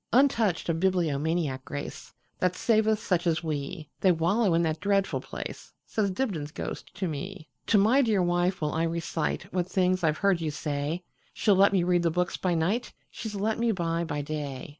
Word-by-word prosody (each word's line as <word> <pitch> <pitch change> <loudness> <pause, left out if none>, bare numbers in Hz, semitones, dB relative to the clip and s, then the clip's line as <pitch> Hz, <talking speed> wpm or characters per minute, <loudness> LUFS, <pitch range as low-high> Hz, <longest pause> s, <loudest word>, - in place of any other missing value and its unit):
Untouched 230 -8 +3
of 165 -1 0
bibliomaniac 160 -5 0
grace, 145 +1 -7 0.3
That 180 0 +1
saveth 220 0 +3
such 180 -5 0
as 160 0 +1
we, 155 +1 -4
They 190 - +5
wallow 180 +3 +2
in 170 - +3
that 160 -1 -1
dreadful 200 0 +1
place,"Says 210 -2 -4
Dibdin's 185 - -2
ghost - - -6
to 190 - -2
me."To 170 +6 -3
my 225 +8 +5
dear 215 -7 +2
wife 175 +1 +1
will 150 -1 0
I 165 +1 +1
reciteWhat 170 +2 -2
things 185 -1 +1
I 160 - +5
've 155 - -7
heard 195 -4 +2
you 160 - -1
say; 150 +3 -3 0.3
She 210 - +2
'll - - +6
let 195 +1 +6
me 190 -3 +2
read 175 0 +3
the 170 - +2
books 180 +2 0
by 180 -2 0
nightShe 195 +10 0 0.3
's 210 - -5
let 215 +3 -1
me 235 0 +2
buy 170 -3 -1
by 145 -3 -3
day. 145 -3 -5
175 Hz, 185 wpm, -28 LUFS, 160-200 Hz, 0.3 s, ll